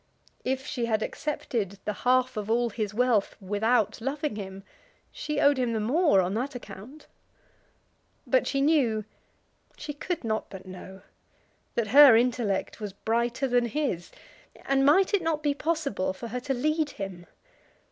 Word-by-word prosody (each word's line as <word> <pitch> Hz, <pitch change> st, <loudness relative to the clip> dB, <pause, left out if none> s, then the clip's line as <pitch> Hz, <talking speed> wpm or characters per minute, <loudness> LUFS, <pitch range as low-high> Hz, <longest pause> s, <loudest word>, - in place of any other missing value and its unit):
If 265 Hz, +1 st, -2 dB
she 240 Hz, -5 st, -2 dB
had 220 Hz, -1 st, +1 dB
accepted 225 Hz, -, -3 dB
the 210 Hz, -, -1 dB
half 255 Hz, +4 st, +1 dB
of 210 Hz, 0 st, -4 dB
all 235 Hz, +1 st, +1 dB
his 210 Hz, -2 st, -3 dB
wealth 230 Hz, -2 st, +1 dB
without 210 Hz, +2 st, 0 dB
loving 285 Hz, +1 st, -2 dB
him, 195 Hz, -1 st, -7 dB, 0.5 s
she 300 Hz, -1 st, -3 dB
owed 285 Hz, -2 st, +4 dB
him 245 Hz, -2 st, 0 dB
the 220 Hz, -, 0 dB
more 255 Hz, -, +3 dB
on 180 Hz, +1 st, -2 dB
that 255 Hz, +5 st, -3 dB
account. 245 Hz, +6 st, -10 dB, 1.2 s
But -, -, +2 dB
she 275 Hz, -, 0 dB
knew, 260 Hz, -8 st, +2 dB, 0.7 s
she 300 Hz, -1 st, -6 dB
could 330 Hz, +3 st, -4 dB
not 220 Hz, -1 st, -2 dB
but 190 Hz, -1 st, -10 dB
know, 185 Hz, +1 st, -10 dB, 0.7 s
that 225 Hz, -3 st, 0 dB
her 275 Hz, -1 st, +9 dB
intellect 235 Hz, -5 st, 0 dB
was 205 Hz, -3 st, -5 dB
brighter 235 Hz, +5 st, -1 dB
than 245 Hz, -1 st, +2 dB
his; 235 Hz, -, -2 dB, 0.6 s
and 270 Hz, 0 st, +2 dB
might 375 Hz, +7 st, +4 dB
it 405 Hz, -, +3 dB
not 320 Hz, -2 st, -1 dB
be 290 Hz, -1 st, +2 dB
possible 280 Hz, -, -1 dB
for 230 Hz, +5 st, -8 dB
her 250 Hz, +3 st, -3 dB
to 270 Hz, +2 st, -2 dB
lead 305 Hz, +4 st, 0 dB
him? 185 Hz, -3 st, -6 dB
240 Hz, 155 wpm, -27 LUFS, 210-285 Hz, 1.2 s, her